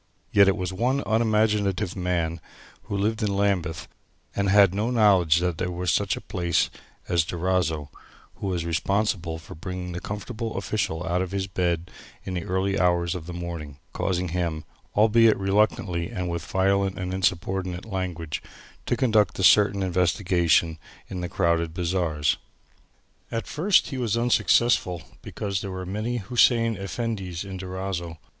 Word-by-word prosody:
Yet 100 Hz, -1 st, +6 dB
it 95 Hz, -, +3 dB
was 90 Hz, 0 st, -3 dB
one 125 Hz, +8 st, 0 dB
unimaginative 105 Hz, -4 st, +1 dB
man 85 Hz, -3 st, -1 dB, 0.4 s
who 100 Hz, -, -3 dB
lived 110 Hz, +3 st, 0 dB
in 100 Hz, -2 st, 0 dB
Lambeth 90 Hz, -5 st, 0 dB, 0.5 s
and 100 Hz, -1 st, +1 dB
had 100 Hz, -2 st, +6 dB
no 105 Hz, +4 st, 0 dB
knowledge 100 Hz, -9 st, +4 dB
that 90 Hz, -1 st, -1 dB
there 90 Hz, -, -1 dB
was 90 Hz, 0 st, -1 dB
such 100 Hz, -3 st, +1 dB
a -, -, -7 dB
place 85 Hz, -1 st, 0 dB, 0.4 s
as 85 Hz, -2 st, +2 dB
Durazzo 80 Hz, -4 st, -1 dB, 0.5 s
who -, -, -4 dB
was 90 Hz, -3 st, -1 dB
responsible 90 Hz, -1 st, 0 dB
for 80 Hz, -, -11 dB
bringing 90 Hz, +2 st, -6 dB
this 90 Hz, -, -5 dB
comfortable 110 Hz, +2 st, -5 dB
official 95 Hz, -4 st, -2 dB
out 90 Hz, +2 st, 0 dB
of 95 Hz, -, -2 dB
his 95 Hz, 0 st, -2 dB
bed 90 Hz, -2 st, -1 dB, 0.3 s
in 95 Hz, -, -5 dB
the 90 Hz, -2 st, -3 dB
early 95 Hz, +2 st, 0 dB
hours 85 Hz, -1 st, +2 dB
of 85 Hz, -3 st, -6 dB
the 90 Hz, -, -6 dB
morning 85 Hz, -5 st, -6 dB, 0.2 s
causing 90 Hz, -1 st, -1 dB
him 85 Hz, -2 st, -2 dB, 0.3 s
albeit 110 Hz, +1 st, +5 dB
reluctantly 95 Hz, -3 st, +1 dB
and 90 Hz, -1 st, -3 dB
with 85 Hz, -2 st, -3 dB
violent 95 Hz, 0 st, +1 dB
and 90 Hz, -1 st, -3 dB
insubordinate 95 Hz, 0 st, -1 dB
language 90 Hz, -6 st, -4 dB, 0.5 s
to -, -, +1 dB
conduct 110 Hz, -5 st, +2 dB
certain 100 Hz, -1 st, +5 dB
investigations 85 Hz, -2 st, +2 dB, 0.3 s
in 90 Hz, -2 st, -4 dB
the 90 Hz, -, -3 dB
crowded 85 Hz, -3 st, 0 dB
bazaars. 85 Hz, -4 st, 0 dB, 0.9 s
At 115 Hz, -2 st, -2 dB
first 180 Hz, +6 st, +2 dB
he 135 Hz, -, -4 dB
was 115 Hz, -2 st, 0 dB
unsuccessful 120 Hz, -7 st, +2 dB, 0.2 s
because 100 Hz, -3 st, -3 dB
there 100 Hz, -, -5 dB
were 95 Hz, -1 st, -5 dB
many 110 Hz, +6 st, -2 dB
Hussein 115 Hz, +1 st, +3 dB
Effendis 100 Hz, -3 st, -4 dB
in 95 Hz, -1 st, -6 dB
Durazzo. 90 Hz, -3 st, -4 dB
95 Hz, 150 wpm, -25 LUFS, 85-105 Hz, 0.9 s, Yet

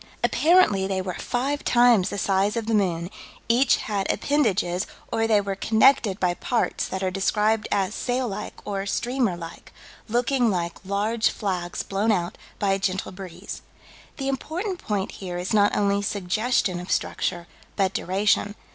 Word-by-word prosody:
Apparently 305 Hz, -, +4 dB
they 190 Hz, -1 st, -1 dB
were 185 Hz, -1 st, -3 dB
five 270 Hz, +9 st, -2 dB
times 240 Hz, -6 st, +4 dB
the -, -, -4 dB
size 195 Hz, +3 st, +1 dB
of 230 Hz, -, -2 dB
the 225 Hz, -, -1 dB
moon: 180 Hz, -4 st, 0 dB, 0.4 s
each 240 Hz, +3 st, +4 dB
had 200 Hz, -2 st, -1 dB
appendages, 200 Hz, -11 st, 0 dB, 0.2 s
or 225 Hz, 0 st, +1 dB
they 215 Hz, -2 st, +4 dB
were 200 Hz, -1 st, -2 dB
connected 220 Hz, -1 st, +3 dB
by 180 Hz, -1 st, +2 dB
parts 235 Hz, +6 st, -1 dB
that 190 Hz, 0 st, -4 dB
are 185 Hz, -, 0 dB
described 210 Hz, +3 st, +1 dB
as 195 Hz, 0 st, +1 dB
"sail 250 Hz, +2 st, -1 dB
like 210 Hz, 0 st, -5 dB
or 195 Hz, -1 st, -3 dB
streamer 240 Hz, -4 st, 0 dB
like," 170 Hz, -1 st, -10 dB, 0.4 s
looking 240 Hz, +1 st, +2 dB
like 170 Hz, -3 st, -3 dB
"large 210 Hz, +4 st, +1 dB
flags 180 Hz, -4 st, -3 dB
blown 200 Hz, +3 st, 0 dB
out 175 Hz, -4 st, -1 dB, 0.2 s
by 200 Hz, -1 st, +1 dB
a 195 Hz, -, +1 dB
gentle 190 Hz, 0 st, -2 dB
breeze." 185 Hz, 0 st, -8 dB, 0.6 s
The 270 Hz, -, -3 dB
important 345 Hz, +8 st, -3 dB
point 205 Hz, -3 st, -2 dB
here 180 Hz, -2 st, -6 dB
is 180 Hz, +3 st, -3 dB
not 205 Hz, -1 st, +3 dB
only 200 Hz, -1 st, +2 dB
suggestion 205 Hz, 0 st, 0 dB
of 180 Hz, -, -7 dB
structure, 175 Hz, -2 st, -1 dB, 0.3 s
but 195 Hz, -2 st, +1 dB
duration. 205 Hz, +2 st, +1 dB
200 Hz, 160 wpm, -24 LUFS, 190-230 Hz, 0.6 s, Apparently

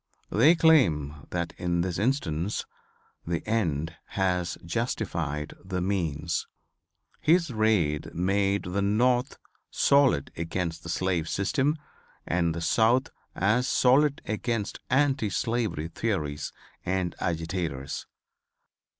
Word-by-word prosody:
They 145 Hz, +11 st, +6 dB
claim 80 Hz, -, +3 dB
that -, -, -3 dB
in 85 Hz, -1 st, 0 dB
this 90 Hz, 0 st, -2 dB
instance 100 Hz, -, -1 dB, 0.6 s
"The 85 Hz, +3 st, -2 dB
End 85 Hz, -8 st, 0 dB, 0.2 s
has 90 Hz, -2 st, 0 dB
justified 85 Hz, -, -2 dB
the 95 Hz, 0 st, -3 dB
Means." 85 Hz, -4 st, -1 dB, 0.7 s
His 170 Hz, -1 st, +3 dB
raid 105 Hz, -10 st, +1 dB
made 100 Hz, +2 st, +1 dB
the 95 Hz, +3 st, -2 dB
North 120 Hz, +6 st, +2 dB, 0.3 s
solid 140 Hz, -, +3 dB
against 85 Hz, 0 st, -3 dB
the 85 Hz, -, -8 dB
slave 90 Hz, -2 st, 0 dB
system 135 Hz, +10 st, +1 dB, 0.5 s
and 85 Hz, -1 st, 0 dB
the 85 Hz, -, -4 dB
South 115 Hz, +8 st, +3 dB, 0.2 s
as 115 Hz, +7 st, +2 dB
solid 140 Hz, +4 st, +3 dB
against 110 Hz, -1 st, -2 dB
anti 135 Hz, -4 st, +2 dB
slavery 110 Hz, -7 st, -1 dB
theories 75 Hz, -8 st, -2 dB, 0.3 s
and 95 Hz, -1 st, -1 dB
agitators. 80 Hz, -5 st, -3 dB
95 Hz, 105 wpm, -27 LUFS, 85-115 Hz, 0.7 s, They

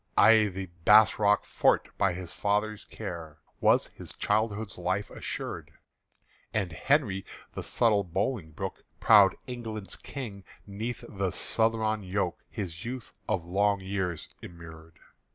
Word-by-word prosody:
I' 110 Hz, 0 st, +7 dB
the 95 Hz, -1 st, -5 dB, 0.2 s
Bass 110 Hz, +4 st, +7 dB
Rock 105 Hz, 0 st, +3 dB
fort, -, -, +1 dB
by 95 Hz, -2 st, +3 dB
his 90 Hz, -1 st, -7 dB
father's 105 Hz, +1 st, -1 dB
care, 80 Hz, -3 st, -7 dB, 0.2 s
Was -, -, +4 dB
his -, -, -9 dB
childhood's 105 Hz, -1 st, -1 dB
life 95 Hz, +4 st, -1 dB
assured; -, -, -5 dB, 0.9 s
And 100 Hz, -5 st, 0 dB
Henry 100 Hz, -, +1 dB, 0.3 s
the -, -, -4 dB
subtle 110 Hz, -4 st, +2 dB
Bolingbroke, 95 Hz, -1 st, -3 dB, 0.2 s
Proud 100 Hz, -3 st, +7 dB
England's 110 Hz, -6 st, -6 dB
King, 105 Hz, -8 st, -7 dB, 0.2 s
'neath 110 Hz, +4 st, -5 dB
the 100 Hz, -2 st, -2 dB
southron 110 Hz, +2 st, +1 dB
yoke 95 Hz, -2 st, -2 dB
His 85 Hz, -6 st, -5 dB
youth 125 Hz, 0 st, -6 dB
for -, -, +2 dB
long 100 Hz, +3 st, +1 dB
years 95 Hz, -4 st, -2 dB
immured. 85 Hz, -1 st, -12 dB
100 Hz, 125 wpm, -29 LUFS, 90-110 Hz, 0.9 s, I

